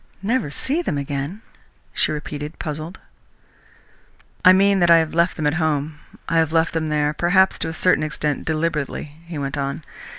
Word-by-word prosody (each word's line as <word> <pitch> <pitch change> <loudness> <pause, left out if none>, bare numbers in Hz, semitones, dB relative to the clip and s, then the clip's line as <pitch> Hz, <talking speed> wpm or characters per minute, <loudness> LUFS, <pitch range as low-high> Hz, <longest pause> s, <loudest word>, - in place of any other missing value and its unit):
"Never 225 - 0
see 275 - -1
them 155 - -2
again?" 140 +8 -4 0.5
she - - +1
repeated, 150 0 -6
puzzled. 155 +3 -5 1.5
"I 185 - +9
mean 195 +1 +4
that 175 -1 +3
I 170 - +8
have 160 -1 0
left 170 +2 +2
them 155 - -3
at 150 - +2
home. 150 -1 -1 0.3
I 165 - +1
have 160 -1 +2
left 165 +1 +2
them 160 -1 -1
there, 150 0 +1
perhaps, 190 +4 +3
to 165 - -2
a - - -5
certain 180 -1 +3
extent 150 -1 -2
deliberately," 155 -2 -2
he 170 -2 -6
went 140 0 -3
on. 140 +3 -3
155 Hz, 175 wpm, -21 LUFS, 150-175 Hz, 1.5 s, I